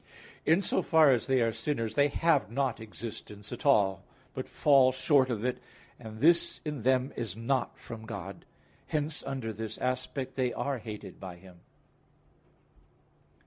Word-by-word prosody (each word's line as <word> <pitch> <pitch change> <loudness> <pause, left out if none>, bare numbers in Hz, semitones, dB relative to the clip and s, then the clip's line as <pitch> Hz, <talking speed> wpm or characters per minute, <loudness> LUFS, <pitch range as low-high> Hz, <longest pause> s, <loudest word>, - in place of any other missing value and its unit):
In 165 +6 +4
so - - +1
far 160 -3 +5
as 120 -4 +1
they 130 -1 +3
are 115 -1 +2
sinners, 115 -2 -2
they 140 +4 +4
have 150 -3 +2
not 130 -1 -1
existence 105 -2 -8
at 125 +3 -4
all, 100 -9 +4 0.3
but - - -5
fall 135 -3 +5
short 130 0 +3
of 115 -1 -2
it; 125 - -1 0.4
and 110 -2 -9
this 170 +2 +4
in 150 -4 -3
them 130 +2 +2
is 110 -6 -3
not 120 +4 -1
from 110 -1 -9
God. - - -7 0.4
Hence 150 0 -1
under 125 -5 -4
this 110 0 -5
aspect, 130 +1 -3
they 125 -2 0
are 140 -3 -2
hated 105 -2 -8
by 95 -2 -7
Him. 90 0 -16
125 Hz, 155 wpm, -30 LUFS, 110-140 Hz, 0.4 s, far